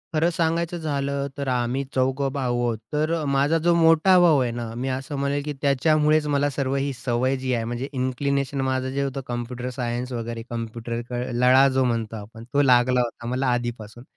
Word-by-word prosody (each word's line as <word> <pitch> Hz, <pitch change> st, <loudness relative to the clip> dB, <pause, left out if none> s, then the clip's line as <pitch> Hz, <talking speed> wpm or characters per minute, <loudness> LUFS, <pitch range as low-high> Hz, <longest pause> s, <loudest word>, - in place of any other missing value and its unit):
खरं 160 Hz, +3 st, +3 dB
सांगायचं 170 Hz, +1 st, 0 dB
झालं, 140 Hz, -3 st, -2 dB
तर 140 Hz, -, -3 dB
आम्ही 125 Hz, +1 st, 0 dB
चौघे 135 Hz, +1 st, +1 dB
भाऊ 125 Hz, -4 st, -1 dB
आहोत. 120 Hz, -2 st, 0 dB, 0.2 s
तर 155 Hz, +2 st, +1 dB, 0.2 s
माझा 140 Hz, +4 st, +3 dB
जो 175 Hz, -, +5 dB
मोठा 165 Hz, +3 st, +5 dB
भाऊ 165 Hz, -5 st, +5 dB
आहे 125 Hz, -2 st, 0 dB
ना, 115 Hz, -1 st, -5 dB
मी 125 Hz, +3 st, -3 dB
असं 135 Hz, +3 st, -4 dB
म्हणेल 140 Hz, +1 st, -1 dB
की 150 Hz, -, -3 dB
त्याच्यामुळेच 150 Hz, +2 st, +3 dB
मला 145 Hz, 0 st, +1 dB
सर्वही, 140 Hz, 0 st, -1 dB
सवय 125 Hz, +2 st, 0 dB
जी 130 Hz, 0 st, -2 dB
आहे, 115 Hz, -2 st, 0 dB
म्हणजे 120 Hz, +4 st, -4 dB
इन्क्लिनेशन 135 Hz, +1 st, -1 dB
माझं 130 Hz, 0 st, -1 dB
जे 140 Hz, -, 0 dB
होतं 135 Hz, 0 st, -3 dB
कॉम्प्युटर 120 Hz, +1 st, -4 dB
सायन्स 125 Hz, 0 st, -3 dB
वगैरे, 115 Hz, -1 st, -4 dB
कम्प्युटर, 115 Hz, 0 st, -4 dB
क -, -, -7 dB, 0.2 s
लळा 125 Hz, +3 st, +5 dB
जो 130 Hz, -, +2 dB
म्हणतो 115 Hz, -3 st, -1 dB
आपण, 110 Hz, +2 st, -10 dB
तो 145 Hz, -, +4 dB
लागला 125 Hz, -1 st, +4 dB
होता 120 Hz, 0 st, -5 dB
मला 130 Hz, +2 st, -1 dB
आधीपासून. 120 Hz, -1 st, -5 dB
130 Hz, 185 wpm, -24 LUFS, 120-140 Hz, 0.2 s, जो